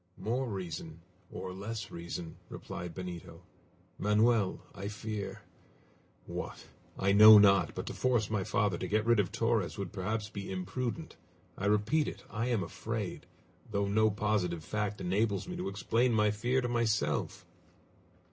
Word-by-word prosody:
"More 125 +4 -1
reason 85 -4 -6 0.3
or 90 - -6
less 105 +2 -5
reason," 85 0 -6
replied 90 -2 -7
Benito. 90 -2 -7 0.6
"Manoel, 105 0 +3
I 100 - -6
fear 105 -1 -5 0.8
what? - - -6 0.3
I 95 +1 +2
know 110 +1 +10
not 100 -5 +5
but - - -4
to - - -5
force 120 -5 +1
my 105 -3 -1
father 100 -2 0
to - - -3
get 110 +1 +1
rid 115 -1 +4
of 95 -3 +1
Torres 115 -4 0
would 100 -4 -5
perhaps 105 +2 -2
be 100 -3 -6
imprudent! 125 - -4 0.4
I 100 - -2
repeat 105 +9 +2
it, - - -6
I 115 +2 -1
am 115 -6 +1
afraid, 105 +3 -5 0.4
though 100 -2 0
no 110 +2 +3
positive 105 -6 0
fact 105 +1 -2
enables 100 - 0
me 180 - -5
to 180 - -2
explain 115 +5 +1
my 105 -1 +3
fear 120 +5 0
to 125 - -1
myself!" 115 -3 0
105 Hz, 150 wpm, -32 LUFS, 95-115 Hz, 0.8 s, know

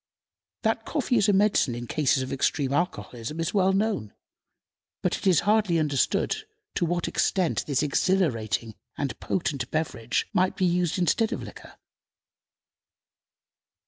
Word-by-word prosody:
That 225 0 +1
coffee 255 -1 0
is 210 0 +3
a - - +4
medicine 195 - +3
in 120 0 -5
cases 135 +1 +1
of 130 - -5
extreme 135 0 0
alcoholism 150 -4 -3
is 165 - -1
well 190 -2 +3
known, 195 - -1 0.9
but - - +1
it - - -3
is 180 -6 +5
hardly 210 -5 +2
understood 150 -4 +1 0.4
to 175 - 0
what 175 0 -1
extent 185 -4 +1
this 140 0 +1
exhilarating 135 - 0 0.2
and 140 -5 -3
potent 140 -8 -2
beverage 135 -7 -1
might 185 +1 +2
be 185 - +2
used 175 -1 +1
in 180 - +2
place 225 +8 +2
of - - -3
liquor. - - -12
165 Hz, 145 wpm, -26 LUFS, 135-195 Hz, 0.9 s, is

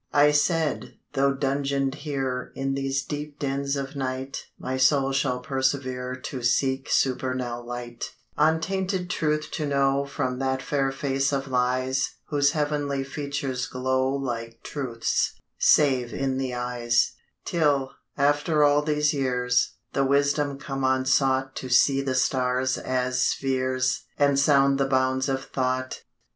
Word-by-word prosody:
I 145 +1 +6
said, 155 0 0 0.2
'Tho' 140 0 +2
dungeon'd 135 0 0
here 135 -4 -3
In 135 0 -1
these 135 0 -1
deep 150 +1 -6
dens 140 0 -1
of 140 0 -4
night, 130 0 -4
My 130 - -4
soul 135 +1 +3
shall 130 -2 0
persevere 130 -1 -1
To 130 0 -6
seek 130 +3 +1
supernal 130 -2 0
light; 120 0 -6 0.2
Untainted 180 +4 0
Truth 150 -1 -1
to 150 - -2
know 140 0 +2
From 125 -2 -2
that 130 0 -1
fair 135 -2 0
face 135 0 0
of 135 -1 -1
Lies 130 +1 0
Whose 145 -1 +2
heav'nly 145 -2 -1
features 140 -2 -3
glow 130 +1 0
Like 120 -4 -4
Truth's, 125 -5 -1 0.2
save 130 -5 +3
in 135 -1 -1
the 130 -2 -2
eyes; 120 -1 +1 0.3
Till, 145 -5 +1 0.3
after 150 +2 +3
all 145 0 +5
these 150 0 +1
years, 125 -3 +1 0.2
The 135 - +2
wisdom 140 +1 +1
come 135 -1 -4
unsought 130 0 +2
To 130 - -5
see 135 +2 +4
the 135 -1 -2
stars 130 0 +1
as 130 0 -1
spheres 130 -1 0
And 140 -1 +3
sound 140 -1 +4
the 135 - +2
bounds 130 0 +1
of 135 0 -1
thought. 130 0 -2
135 Hz, 135 wpm, -25 LUFS, 130-140 Hz, 0.3 s, I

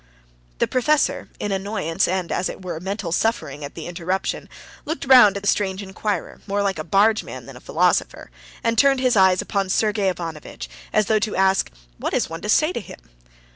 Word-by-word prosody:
The - - +1
professor, 290 +4 +1
in 205 - -2
annoyance, 195 -4 -1
and, 185 -1 -2
as 180 - 0
it - - -8
were, 175 -3 -4
mental 195 0 -4
suffering 160 - -1
at 145 - -8
the 165 - -7
interruption, 180 +2 -3 0.3
looked 315 0 -4
round 250 -7 +7
at 200 - -7
the - - -2
strange 195 -1 0
inquirer, 195 -1 -4
more 200 0 0
like 195 -4 -1
a - - -2
bargeman 205 +6 +1
than - - -11
a - - -10
philosopher, - - 0 0.3
and 230 0 +1
turned 275 -1 +5
his 255 -2 +2
eyes 190 -2 +4
upon 195 -2 -1
Sergey 205 -1 +1
Ivanovitch, 160 - -6 0.2
as 215 - +3
though 215 +1 +2
to 215 0 -2
ask: 190 0 +2 0.3
What's - - -1
one 165 - -6
to 210 - -5
say 310 +9 +3
to - - -3
him? - - -11
195 Hz, 190 wpm, -22 LUFS, 180-215 Hz, 0.3 s, round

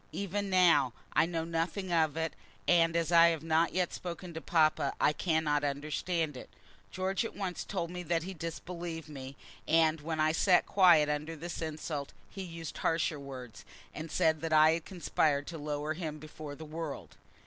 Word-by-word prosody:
Even 200 +1 -2
now 170 -9 +4 0.2
I - - +4
know 165 -2 -2
nothing 170 +3 -2
of 160 -2 +2
it, 160 0 -1 0.3
and 165 -1 +4
as 170 0 +1
I 170 0 +8
have 165 -2 0
not 165 +1 +2
yet 180 -1 0
spoken 175 0 -6
to 160 - -6
papa 155 -4 +2
I 150 - +4
cannot 155 -3 +1
understand 150 +2 -1
it. 125 - -9 0.4
George 190 +4 -1
at 230 - -6
once 190 -3 -3
told 175 -4 -3
me 180 0 -5
that 170 -1 0
he 190 +2 -6
disbelieved 165 -1 -6
me, 135 -2 -8 0.3
and 160 -1 +3
when 160 +1 -3
I 155 0 +4
sat 180 +3 +4
quiet 175 -6 +6
under 150 +2 -2
this 170 +3 -6
insult, 155 -2 -4 0.2
he 195 - -7
used 165 -3 -7
harsher 165 -2 0
words, 125 -7 -9 0.3
and 160 +2 -6
said 160 0 +2
that 165 -1 -2
I 155 0 +7
had 165 0 -2
conspired 155 -5 0
to 165 0 -7
lower 150 +1 -2
him 155 -2 -5
before 155 -1 -9
the 160 - -9
world. 155 -1 -6
160 Hz, 180 wpm, -31 LUFS, 150-170 Hz, 0.4 s, I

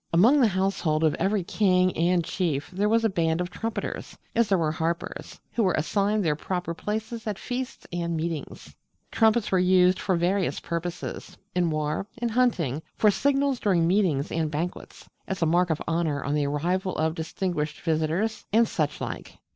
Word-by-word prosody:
Among 235 +13 +5
the 240 - +6
household 185 -5 0
of 155 - +4
every 195 +2 +1
king 185 -2 +2
and 175 +1 +2
chief 160 -3 -2
there 200 +3 0
was 225 +1 +3
a - - +6
band 165 -3 0
of 180 0 -3
trumpeters 225 +4 -4 0.2
as 230 -2 +2
there 195 - +4
were 160 -3 +1
harpers 165 +2 -4
who 235 - 0
were 185 -5 +2
assigned 200 +5 +1
their 150 -2 +2
proper 180 +2 -3
places 220 +5 -4
at 210 -2 -2
feasts 250 +3 -5
and 170 -1 -1
meetings. 160 -2 -5 0.4
Trumpets 220 -1 +3
were 190 - +3
used 180 0 +4
for 190 - +1
various 180 +3 0
purposes: 170 +1 -5 0.2
in 180 -2 +1
war; 155 +5 -2
in 240 0 0
hunting; 200 - +1
for 210 - +4
signals 275 +2 +1
during 180 -6 +2
meetings 170 -6 +1
and 160 -1 0
banquets; 165 +4 -5 0.2
as 190 -3 -2
a - - +4
mark 175 +2 +3
of 160 - 0
honour 165 -4 0
on 140 - -1
the 150 -1 +1
arrival 180 +6 -1
of 160 0 +1
distinguished 160 -1 -3
visitors; 165 +7 0
and 225 +2 +4
such 150 -6 -2
like. - - -6
180 Hz, 180 wpm, -26 LUFS, 160-210 Hz, 0.4 s, the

